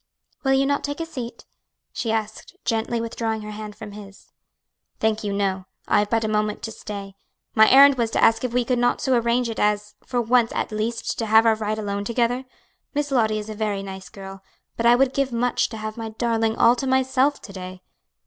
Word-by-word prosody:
"Will 270 -1 +3
you 270 0 +3
not 285 +1 0
take 285 +1 -4
a 330 - -2
seat?" 245 -7 -7 0.5
she 225 - -2
asked, 220 -1 -4
gently 230 +1 0
withdrawing 225 -1 -3
her 210 - -7
hand 210 0 -7
from 215 -1 -9
his. 200 -1 -13 0.7
"Thank 220 0 0
you, 205 - -2
no; 195 -2 -1 0.2
I - - +4
have 205 0 0
but 225 0 +1
a - - 0
moment 210 0 -1
to 225 - -4
stay. 200 -2 -7 0.4
My 220 0 +6
errand 275 0 +7
was 230 -1 +1
to - - 0
ask 225 - +4
if 250 - -1
we 245 0 +1
could 250 0 0
not 245 0 +2
so 265 - +1
arrange 235 +1 +1
it 225 - -5
as, 210 0 0
for 250 - -2
once 240 0 +3
at - - -2
least, 220 +2 -2
to 225 - -1
have 220 +1 +6
our 225 - +5
ride 215 0 -2
alone 200 -1 -3
together? 240 +3 0 0.5
Miss 290 -1 -1
Lottie 220 -5 +2
is 210 0 -5
a 215 - -5
very 210 -2 -2
nice 190 -1 -8
girl, 195 -1 -10 0.3
but 235 - +1
I 240 - +7
would 265 +1 +2
give 275 -1 0
much 240 +1 +1
to 225 - -7
have 215 0 -6
my 225 -1 -4
darling 225 0 0
all 235 - +5
to 270 - -2
myself 260 +2 +2
to 200 - -10
day." 185 -1 -8
225 Hz, 225 wpm, -23 LUFS, 210-245 Hz, 0.7 s, errand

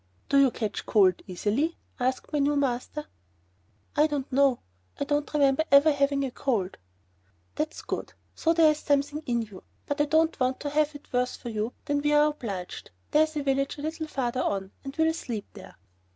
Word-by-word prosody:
"Do 280 - +5
you 275 -1 +6
catch 220 -3 -4
cold 190 -4 +4
easily?" 215 - -1 0.2
asked 255 +4 -1
my 295 - +2
new 285 +1 +2
master. 280 +2 -1 0.9
"I 300 +1 +5
don't 290 -3 -3
know. 270 -1 +4 0.4
I - - +1
don't 290 0 -1
remember 285 0 +3
ever 280 +3 +7
having 280 -1 +1
a 260 - -4
cold." 215 - -1 0.7
"That's 305 +1 -3
good. - - -4 0.2
So 330 - +1
there 325 -2 +6
is 300 - -3
something 290 +1 0
in 235 -2 +1
you. 205 -4 -12 0.2
But 285 +1 -1
I - - +4
don't 320 +2 +2
want 255 0 +1
to 290 - -3
have 300 0 +1
it 290 - -13
worse 250 0 +1
for 240 - -7
you 220 +1 -2
than 285 0 0
we 295 +1 +2
are 295 0 +5
obliged. 200 -11 -6 0.2
There 300 - +5
is 315 0 +1
a 290 - -1
village 275 +1 0
a 290 - -7
little 315 0 -3
farther 255 -3 -1
on 195 -1 -2
and 275 0 -7
we'll 320 0 +2
sleep 230 -10 -5
there." 195 -3 -12
280 Hz, 195 wpm, -27 LUFS, 245-300 Hz, 0.9 s, ever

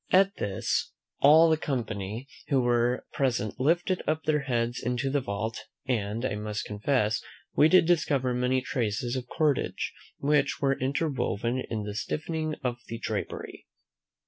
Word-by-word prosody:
At 195 +2 +4
this, 95 -2 -1 0.3
all 155 +4 +7
the 160 -1 +3
company 115 -5 -3 0.2
who 135 - +3
were 120 0 +2
present 120 -5 0
lifted 175 +6 +2
up 155 +1 0
their 150 -2 +1
eyes 120 0 0
into 125 +3 -1
the 145 0 +1
vault; 110 0 -3 0.3
and 115 -1 -1
I - - -1
must 105 0 -3
confess, 105 0 0 0.3
we 155 - +5
did 185 -1 +6
discover 140 -7 +2
many 125 +1 +1
traces 120 -1 -1
of 125 -1 -4
cordage, 150 +1 0 0.2
which 145 0 +2
were 135 -1 +3
interwoven 130 -4 -1
in 110 -2 -2
the 105 0 -4
stiffening 155 +7 -2
of 125 -2 -1
the 115 - -5
drapery. - - -5
125 Hz, 145 wpm, -28 LUFS, 115-150 Hz, 0.3 s, all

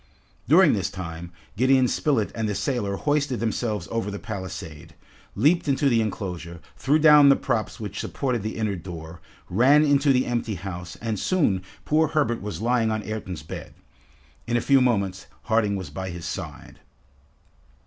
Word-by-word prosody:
During 165 +4 +6
this 95 -3 -1
time, 85 -2 -7 0.2
Gideon 130 +3 +4
Spilett 130 -6 0
and 110 -2 -2
the 105 - -2
sailor 100 -1 -1
hoisted 145 -1 0
themselves 110 -4 -2
over 115 -3 -2
the 100 - -5
palisade, 95 -8 -7 0.4
leaped 150 - +3
into 140 0 +2
the 115 -3 +3
enclosure, 90 -5 -5 0.2
threw 145 +3 +2
down 150 -2 +7
the 140 - +7
props 110 - -2
which 105 -2 -6
supported 125 -5 -2
the 110 +2 -4
inner 110 -3 -1
door, 85 -2 -9 0.3
ran 135 +10 +4
into 145 0 +3
the 130 -1 +2
empty 120 -3 -2
house, 90 -1 -7
and 110 -3 -2
soon, 140 - +1 0.2
poor 155 +1 +3
Herbert 140 -7 0
was 105 +1 -5
lying 120 -1 +2
on 110 -1 -2
Ayrton's 95 -7 -5
bed. 80 - -8 0.7
In 120 0 +1
a - - +2
few 135 +3 +4
moments, 100 -7 0 0.2
Harding 110 -3 +1
was 95 -2 -6
by 95 0 -5
his 85 -2 -7
side. - - -7
110 Hz, 165 wpm, -24 LUFS, 95-135 Hz, 0.7 s, down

